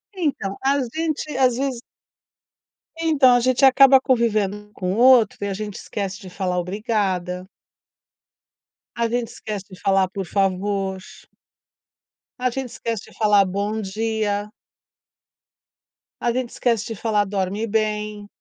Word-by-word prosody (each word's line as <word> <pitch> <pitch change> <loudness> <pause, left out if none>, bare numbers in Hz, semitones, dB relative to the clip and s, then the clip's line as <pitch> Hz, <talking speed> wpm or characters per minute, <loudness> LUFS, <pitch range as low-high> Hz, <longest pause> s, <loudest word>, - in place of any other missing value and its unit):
Então 285 - -2
a 275 +1 +3 0.2
gente, 310 -2 -2
às 255 -2 +3
vezes 265 -3 -2 1.2
Então, 285 -6 +5
a - - +4
gente 255 +2 +3
acaba 270 0 +7
convivendo 230 -6 +1
um 210 0 -13
com 185 -1 -2
o - - -3
outro 245 -3 +6
e 200 - -1
a 200 - -2
gente 205 0 -5
esquece 195 -1 -5
de 185 - -10
falar 180 -1 -2
"obrigada". 185 -2 -2 1.5
A 235 0 +1
gente 240 -1 -1
esquece 205 -3 -6
de 185 - -12
falar 195 -1 +2
"por 195 -1 -4
favor". 195 +1 -1 1.4
A 255 0 +1
gente 260 +1 -4
esquece 230 -3 -5
de - - -20
falar 210 -2 +4
"bom 200 +3 -2
dia". 210 0 -2 1.7
A 240 - +1
gente 250 0 -2
esquece 230 -3 0
de 225 - -5
falar 210 0 +1
"dorme 200 +2 -2
bem". 210 -1 -2
215 Hz, 135 wpm, -22 LUFS, 195-245 Hz, 1.7 s, acaba